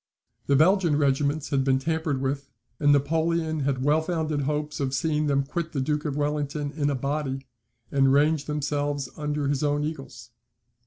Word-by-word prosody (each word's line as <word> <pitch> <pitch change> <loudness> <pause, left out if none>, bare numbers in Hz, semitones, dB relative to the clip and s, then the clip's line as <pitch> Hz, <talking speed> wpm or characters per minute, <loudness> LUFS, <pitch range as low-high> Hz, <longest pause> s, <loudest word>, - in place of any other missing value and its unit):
The 140 - +4
Belgian 170 0 +4
regiments 145 +1 +1
had 140 -3 +1
been 130 -1 +3
tampered 155 -1 -1
with; 135 +1 -2 0.3
and 145 -1 +4
Napoleon 160 +2 +1
had 135 -2 -1
well 150 +3 +3
founded 160 -3 -1
hopes 150 +1 -2
of 135 -1 -1
seeing 150 0 0
them 140 -1 +2
quit 165 +4 -4
the 140 - -1
Duke 150 +3 -1
of 145 -2 -2
Wellington 145 0 -1
in 145 -2 -1
a 140 - 0
body, 135 0 -2 0.5
and 135 -1 +4
range 150 +2 +3
themselves 145 -2 -2
under 150 -1 -2
his 140 +1 0
own 145 0 +1
eagles. 135 -7 -7
145 Hz, 170 wpm, -26 LUFS, 140-155 Hz, 0.5 s, The